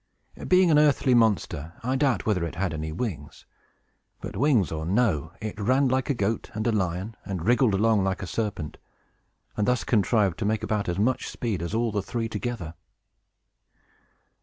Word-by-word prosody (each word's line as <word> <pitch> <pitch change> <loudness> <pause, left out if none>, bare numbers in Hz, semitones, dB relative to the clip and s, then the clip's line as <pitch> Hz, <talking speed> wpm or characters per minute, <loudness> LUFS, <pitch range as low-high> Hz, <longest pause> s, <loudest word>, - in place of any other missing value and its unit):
Being 185 -2 +5
an 150 - +6
earthly 145 -3 +3
monster, 95 -9 +1
I 130 +2 0
doubt 135 -2 +1
whether 100 -6 +1
it 85 - -4
had 90 -2 -1
any 80 0 -4
wings; 80 -6 -5 0.7
but, - - -7
wings 130 - +2
or 80 -1 -3
no, 90 -5 +1
it 110 0 -6
ran 130 +6 +2
like 130 +2 0
a 140 - +2
goat 110 0 -1
and 110 - -2
a 120 - +2
lion, 95 +1 -2
and 95 -5 -5
wriggled 120 -2 +3
along 110 0 +3
like 95 +1 -1
a - - -3
serpent, 95 -6 -4 0.8
and 105 - 0
thus 125 -1 +1
contrived 105 -5 +2
to - - -1
make 110 +1 0
about 105 -3 -1
as 85 - -2
much 120 +6 0
speed 110 -8 -3
as 85 +5 -3
all 115 0 +1
the 100 -1 -1
three 115 +3 -3
together. 110 -8 -4
105 Hz, 180 wpm, -26 LUFS, 90-120 Hz, 0.8 s, an